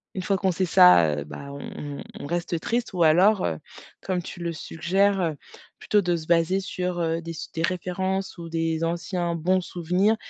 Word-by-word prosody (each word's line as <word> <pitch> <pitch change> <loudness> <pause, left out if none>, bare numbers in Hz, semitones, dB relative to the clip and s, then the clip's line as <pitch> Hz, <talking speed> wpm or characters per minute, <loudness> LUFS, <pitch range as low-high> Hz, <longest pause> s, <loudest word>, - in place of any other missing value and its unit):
une 185 - -2
fois 195 +1 0
qu'on 190 -1 +1
sait 185 +2 0
ça, 90 - +6
heu, 70 - -4
bah 140 - -9
on 140 0 -7
on - - -7 0.2
on - - -7
reste 175 0 -2
tristes 235 -1 -2
ou 175 -2 +2
alors, 185 +6 +5
heu, 80 -2 -1 0.4
comme 185 -2 -2
tu 175 - -9
le 170 -1 -2
suggères, 190 +6 0
heu, 160 -3 0 0.4
plutôt 210 -1 +2
de 175 -1 +1
se 160 -1 -6
baser 170 +3 +3
sur, 180 -2 -3
heu, 165 0 0
des 165 0 -6
su 165 - -7
des 165 - -2
références 185 +2 -2
ou 170 - -7
des 165 0 -1
anciens 175 0 -2
bons 185 +3 +2
souvenirs 180 +5 +1
175 Hz, 205 wpm, -25 LUFS, 165-185 Hz, 0.4 s, ça